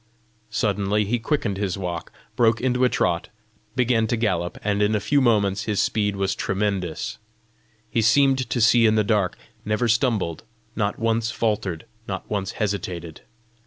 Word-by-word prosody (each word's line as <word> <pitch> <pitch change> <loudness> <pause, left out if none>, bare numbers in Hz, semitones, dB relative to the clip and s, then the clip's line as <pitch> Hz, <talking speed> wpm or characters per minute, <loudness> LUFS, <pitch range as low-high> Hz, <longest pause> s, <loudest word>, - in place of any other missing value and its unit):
Suddenly 105 -1 0
he 120 +4 0
quickened 110 -5 -1
his 100 -2 -2
walk; 90 -3 -4 0.2
broke 115 -1 +3
into 125 0 +1
a 125 - +5
trot; 85 -7 0 0.5
began 120 -3 +2
to 120 - 0
gallop, 90 -6 -1
and 105 0 0
in 105 +1 +2
a - - +2
few 105 +8 +2
moments 100 -5 +2
his 105 -3 -1
speed 105 -2 +1
was 95 -1 0
tremendous. 100 +1 -2 0.7
He 115 - 0
seemed 130 +3 +3
to 120 - 0
see 115 0 +6
in 110 - +3
the 110 - +3
dark; 100 -4 +1 0.3
never 105 +3 0
stumbled, 110 -7 +1 0.3
not 105 -2 -1
once 115 0 0
faltered, 105 -8 -2 0.2
not 95 -1 -5
once 100 -2 -2
hesitated. 90 -6 -3
105 Hz, 160 wpm, -23 LUFS, 100-115 Hz, 0.7 s, see